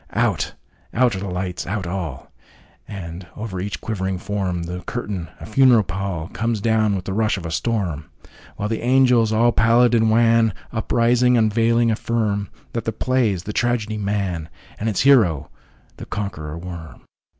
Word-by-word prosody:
Out—out 120 -2 -1
are - - -3
the 100 0 -4
lights—out 90 +2 -3
all! 85 -7 -5 0.6
And, 90 -2 -7
over 105 -4 -5
each 100 +3 -4
quivering 95 -4 -2
form, 95 -3 -2
The 90 +2 -5
curtain, 100 -8 -4
a - - -8
funeral 120 -1 +5
pall, 95 -3 -4
Comes 115 0 -1
down 110 -1 +2
with 95 -1 -4
the 95 - -3
rush 110 0 +1
of 90 - -7
a 85 - -4
storm, 90 -8 -1 0.5
While 105 - -2
the 110 +1 -2
angels, 125 -3 +4
all 115 +2 +4
pallid 115 +3 +4
and 115 -1 +4
wan, 115 -1 +4 0.2
Uprising, 120 +2 +3
unveiling, 115 +1 +3
affirmThat 110 0 -2
the 115 - 0
play 125 +1 +1
is 90 -4 -3
the 105 - -5
tragedy, 110 -3 0
'Man,'And 100 0 -3
its 100 - 0
hero 95 - +4 0.5
the - - -9
Conqueror 85 -7 -4
Worm. 85 -2 -9
105 Hz, 150 wpm, -21 LUFS, 90-115 Hz, 0.6 s, funeral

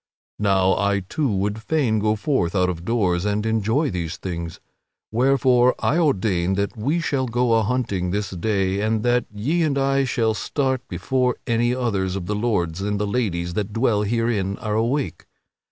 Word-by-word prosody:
Now, 95 -2 +3
I 100 0 +1
too 140 - -2
would 105 +2 -1
fain 120 -4 +1
go 105 +1 +1
forth 105 - 0
out 90 -1 +2
of 85 -1 -8
doors 90 -5 +1
and 105 +1 -1
enjoy 110 +7 +1
these 85 -2 -4
things; 85 -3 -5 0.5
wherefore 125 +1 +3
I 165 - +1
ordain 95 - +1
that 100 0 -2
we 140 +10 0
shall 140 -5 -1
go 120 0 +1
a 115 - +4
hunting 105 -6 -1
this 100 +1 -2
day 95 +1 0
and 110 0 0
that 125 0 +2
ye 130 +12 -1
and 150 -4 +1
I 135 0 +2
shall 115 -3 +1
start 130 +3 -1
before 130 -3 0
any 120 0 +1
others 100 -7 -1
of 95 -3 -4
the 105 - -2
lords 100 -6 -1
and 105 0 -1
the 105 - 0
ladies 95 -6 -1
that 105 +2 -3
dwell 115 -2 +2
herein 105 -3 0
are 105 -1 -3
awake. 120 +6 -1
110 Hz, 175 wpm, -22 LUFS, 95-125 Hz, 0.5 s, a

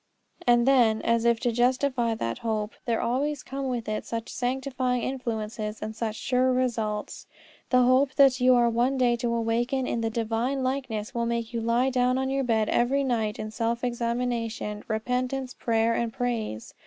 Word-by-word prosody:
And 240 0 +4
then, 235 -5 +4
as 230 0 +1
if 235 -1 +3
to 240 - +1
justify 245 0 +1
that 115 - -3
hope, 220 -2 -2
there 230 -2 0
always 270 +4 -1
come 270 +1 -4
with 240 -3 -3
it 215 0 -2
such 230 0 -5
sanctifying 255 -1 -1
influences 220 -4 -3
and 220 0 -5
such 220 -1 -3
sure 255 +2 +1
results. 225 -5 -2 0.4
The 250 -1 +5
hope 260 +2 +3
that 270 -2 +5
you 255 0 +6
are 240 -1 +4
one 240 +4 +1
day 245 -2 +3
to 235 0 -1
awaken 235 +3 0
in 235 - -1
the 225 - 0
Divine 230 +4 -1
likeness 255 -5 -3
will 235 -1 -1
make 235 0 -2
you 230 - -1
lie 235 +3 +2
down 250 0 +2
on 265 0 -1
your 275 0 0
bed 220 -3 +1
every 270 +4 +2
night 225 -5 -1
in 215 - -5
self 235 +1 -2
examination, 235 -3 -2
repentance, 250 +4 -2
prayer, 230 0 +1
and 230 0 -1
praise. 230 - -3
240 Hz, 180 wpm, -26 LUFS, 225-255 Hz, 0.4 s, you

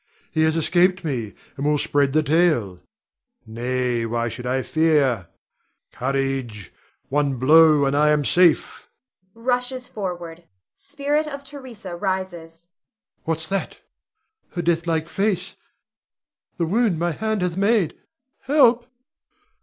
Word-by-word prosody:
He 160 - 0
has 160 +1 +1
escaped 180 +3 +2
me, 120 -9 -3 0.2
and 140 - -5
will 150 0 +3
spread 145 -1 +1
the 155 +2 +2
tale. 150 - +1 0.7
Nay, 120 +1 -2
why 115 +1 -1
should 125 +2 -7
I 130 +1 0
fear? 145 - +1 0.6
Courage! 130 - -3 0.4
One 140 -1 +1
blow, 150 +3 +5
and 135 +1 0
I 150 +1 +4
am 150 -1 +2
safe! 175 0 +2 0.5
[Rushes 250 +2 -2
forward. 175 -4 -6 0.3
Spirit 295 +2 -2
of 280 -1 -7
Theresa 250 -10 -9
rises.] 175 -3 -4 0.6
What's 160 0 -2
that? 195 0 -3 0.8
her 175 - -3
deathlike 165 -1 0
face, 200 +2 -1 1.0
the 170 - 0
wound 205 0 +1
my 170 +1 0
hand 215 +3 -2
hath 180 -2 -1
made! 200 -3 +2 0.4
Help! 250 -4 +3
165 Hz, 120 wpm, -22 LUFS, 135-195 Hz, 1.0 s, blow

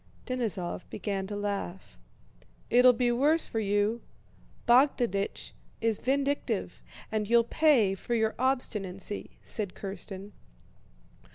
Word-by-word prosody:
Denísov 220 -9 -3
began 195 -2 -3
to 205 - -4
laugh. 200 -2 -4 0.7
"It'll 250 +1 +7
be 245 0 +1
worse 295 +7 +3
for 225 - -3
you. 205 +2 +1 0.7
Bogdánich 240 -5 +2 0.3
is 225 -2 0
vindictive 280 +2 -1 0.3
and 215 -1 -1
you'll 235 0 +5
pay 240 -6 +3
for 215 +5 -3
your 220 -1 +1
obstinacy," 210 -7 -2
said 205 -4 -2
Kírsten. 195 0 -6
220 Hz, 105 wpm, -29 LUFS, 200-250 Hz, 0.7 s, It'll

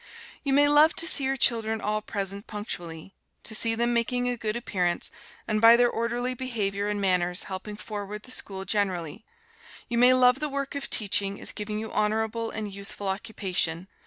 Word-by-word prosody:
You 280 - -1
may 290 +2 +5
love 295 +2 +5
to 335 - 0
see 280 -4 +3
your 270 +1 0
children 225 -2 +2
all 215 0 -1
present 200 -1 -4
punctually, 175 -5 -6 0.3
to 220 - -4
see 225 +1 +4
them 235 +1 +1
making 245 +1 0
a 245 - 0
good 220 -2 -3
appearance, 180 -7 0 0.4
and 215 -1 0
by 230 +1 +9
their 240 0 +3
orderly 240 +2 -2
behavior 210 -6 -2
and 210 0 -2
manners 180 -2 +1
helping 200 +2 -7
forward 210 0 -6
the 255 - -10
school 195 -5 -1
generally; 190 -2 -1 0.7
you 235 0 0
may 250 +1 +7
love 250 0 +4
the 300 - -2
work 275 0 -3
of 280 -1 -4
teaching 200 -1 +1
as - - -2
giving 210 0 -5
you 220 +1 -5
honorable 220 +2 -1
and 210 -2 -5
useful 200 0 -4
occupation. 190 -4 -2
215 Hz, 185 wpm, -26 LUFS, 200-240 Hz, 0.7 s, by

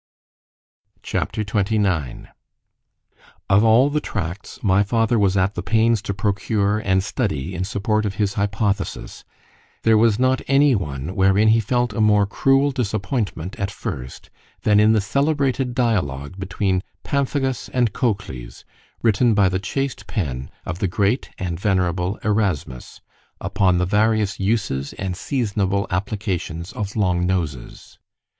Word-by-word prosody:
C - - -6
H - - +3
A - - 0
P. 110 - -4
XXIX 100 - -1 1.2
OF 100 +2 +5
all 115 +6 +5
the 150 +1 0
tracts 95 - -5
my 100 -1 +4
father 115 +2 +1
was 100 -1 +2
at 95 +1 +2
the 90 - -4
pains 110 +3 +2
to 100 - -4
procure 100 +1 0
and 95 -3 +1
study 95 - -2
in 90 0 -2
support 105 +2 0
of 100 - -4
his 100 -1 0
hypothesis, 100 0 -2 0.6
there 110 -1 +5
was 110 -2 +4
not 130 +1 +2
any 140 +1 +4
one 75 - -3
wherein 95 +3 +4
he 115 +1 +5
felt 120 +1 0
a 110 - -1
more 105 -1 +4
cruel 135 +7 +2
disappointment 105 - -2
at 100 - -1
first, 75 - -7 0.3
than 105 -1 +4
in 110 +1 +5
the 110 - +3
celebrated 135 +1 0
dialogue 90 - 0
between 95 0 -1 0.2
Pamphagus 135 -3 -1
and 120 -5 +1
Cocles, 100 - -3 0.4
written 115 0 +3
by 100 -2 +4
the 95 0 -1
chaste 135 +7 -3
pen 70 - -3 0.2
of 90 - -4
the 100 - +1
great 100 +7 0
and 85 -4 -4
venerable 90 -1 0
Erasmus, 95 - -2 0.4
upon 95 -3 +1
the 90 - +1
various 105 +1 +1
uses 95 -10 -1
and 95 -2 -4
seasonable 100 -4 -1
applications 90 -3 -3
of 105 -5 -4
long 90 -4 +1
noses. 80 -9 -4
100 Hz, 145 wpm, -21 LUFS, 95-115 Hz, 1.2 s, OF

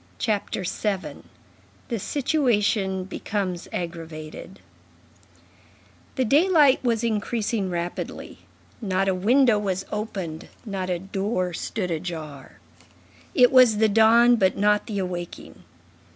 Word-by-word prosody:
CHAPTER 205 -3 -2
VII—THE 210 +4 -6
SITUATION 210 -8 0
BECOMES 190 -1 -4
AGGRAVATED 165 +1 -7 1.6
The 260 - +1
daylight 295 - +4
was 235 -2 0
increasing 220 -2 -1
rapidly. 175 0 -5 0.4
Not 195 -2 0
a 190 - +2
window 225 +4 +3
was 190 -2 -2
opened, 190 -7 -5 0.2
not 195 -3 -4
a 180 - 0
door 195 0 -2
stood 180 +1 -3
ajar; 155 -4 -6 0.8
it 250 -2 +6
was 250 -5 +6
the 220 0 +3
dawn 230 +3 +5
but 190 -3 +2
not 210 +1 +2
the 210 - -4
awaking. 180 -2 -6
200 Hz, 105 wpm, -24 LUFS, 185-230 Hz, 1.6 s, it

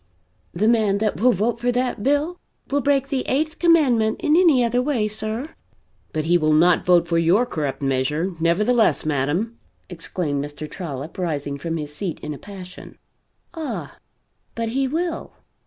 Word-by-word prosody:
The 205 +5 0
man 215 -4 +3
that 215 0 -1
will 250 +2 +6
vote 230 +3 0
for 245 +1 +1
that 250 -3 -1
bill 290 +8 0 0.3
will 285 +1 +2
break 275 -1 +1
the 270 -2 0
eighth 310 +4 -1
commandment 265 -11 +3
in 305 - +3
any 325 -8 +5
other 245 +1 +1
way, 250 -6 0
sir!" 215 +6 -3 0.6
"But 155 -2 -2
he 175 +2 +3
will 155 -1 +2
not 170 +2 +4
vote 175 -1 +5
for 165 0 +2
your 180 +9 +3
corrupt 145 - -3
measure, 140 +7 0
nevertheless, 210 +9 +2
madam!" 155 - -1 0.3
exclaimed 165 -4 -3
Mr. 145 +1 -7
Trollop, 150 -2 -7
rising 145 -5 -2
from 165 +3 -3
his 150 -1 -6
seat 175 +1 -4
in 150 - -5
a 145 - -9
passion. 185 -2 -11 0.6
"Ah, 320 -3 -5 0.6
but 230 -1 -2
he 265 +3 0
will. 330 +4 -3
205 Hz, 165 wpm, -22 LUFS, 160-250 Hz, 0.6 s, will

